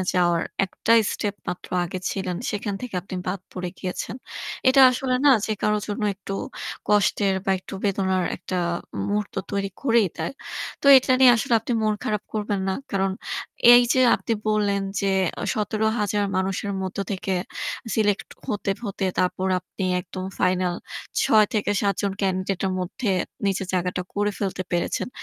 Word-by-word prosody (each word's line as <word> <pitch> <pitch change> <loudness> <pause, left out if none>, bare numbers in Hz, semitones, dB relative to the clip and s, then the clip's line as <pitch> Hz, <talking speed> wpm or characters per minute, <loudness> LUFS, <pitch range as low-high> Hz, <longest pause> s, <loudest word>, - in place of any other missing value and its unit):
এ - - +1
যাওয়ার 175 -2 +3 0.2
একটাই 230 +4 +3
স্টেপ 205 -2 -2
মাত্র 180 0 -5 0.2
আগে 175 +2 -4
ছিলেন 185 -2 -3
সেখান 205 -1 -3
থেকে 250 -5 -7
আপনি 190 - -8
বাদ 185 0 -2
পড়ে 180 -1 -4
গিয়েছেন। 185 +5 -4 0.5
এটা 265 +1 +6
আসলে 255 0 -1
না - - +8 0.2
যে 220 - 0
কারো 210 0 +2
জন্য 210 0 -3
একটু 195 0 -8 0.6
কষ্টের 200 -1 +3
বা - - +1
একটু 185 - -10
বেদনার 190 -2 +1
একটা 185 +1 -5 0.5
মুহূর্ত 205 0 -2 0.2
তৈরি 200 -1 -1
করেই 230 -6 +4
দেয়। - - -3 0.5
তো - - -3
এটা 260 0 +4
নিয়ে 255 -2 +9
আসলে 230 +1 +1
আপনি 245 - -3
মন 215 -1 +2
খারাপ 210 -1 -1
করবেন 210 -2 -1
না। 190 - +1 0.2
কারণ 195 -1 +1 0.6
এইযে 245 +1 +5
আপনি - - -2 0.2
বললেন 205 -2 +1 0.2
যে 195 - +1 0.3
এ - - -1
১৭,০০০ 215 -1 0
মানুষের 195 +2 -1
মধ্যে 190 +1 -3
থেকে 190 0 -2 0.6
সিলেক্ট 210 -2 +1 0.2
হতে, 205 -1 -1
হতে 200 -2 -3
তারপর 185 +1 +1
আপনি 185 +1 -6 0.2
একদম 185 +1 -7
ফাইনাল 180 -1 +1 0.5
৬ 215 -1 +5
থেকে 210 -1 +1
৭ 200 -1 +2
জন 200 -1 0
ক্যান্ডিডেট 185 -1 -1
এর 190 - 0
মধ্যে 195 +5 -2 0.4
নিজের 195 0 0
জায়গাটা 180 0 -1
করে 205 0 +1
ফেলতে 190 -2 -2
পেরেছেন। 175 +6 0
200 Hz, 160 wpm, -24 LUFS, 185-215 Hz, 0.6 s, নিয়ে